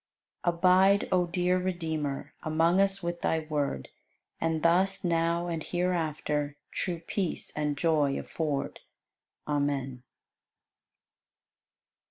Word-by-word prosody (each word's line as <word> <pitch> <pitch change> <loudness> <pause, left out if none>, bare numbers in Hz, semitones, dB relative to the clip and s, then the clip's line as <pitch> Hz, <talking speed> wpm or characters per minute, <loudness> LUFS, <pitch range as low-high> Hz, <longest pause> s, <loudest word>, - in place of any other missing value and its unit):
92. 175 -1 +1
Abide, 190 +3 +5
O 180 -1 +3
dear 180 +1 +1
Redeemer, 160 -6 -3
Among 165 +4 +3
us 195 -1 +1
with 170 0 -3
Thy 160 - +1
Word 145 - -2 0.5
And 160 -1 -1
thus 185 +3 +3
now 170 0 +1
and 165 -2 -3
hereafter 155 -5 -1
True 175 -3 -2
peace 185 -3 -2
and 150 -1 -1
joy 150 -3 +2
afford. 150 -4 -3 0.7
Amen. 140 -3 -1
165 Hz, 105 wpm, -29 LUFS, 150-180 Hz, 0.7 s, Abide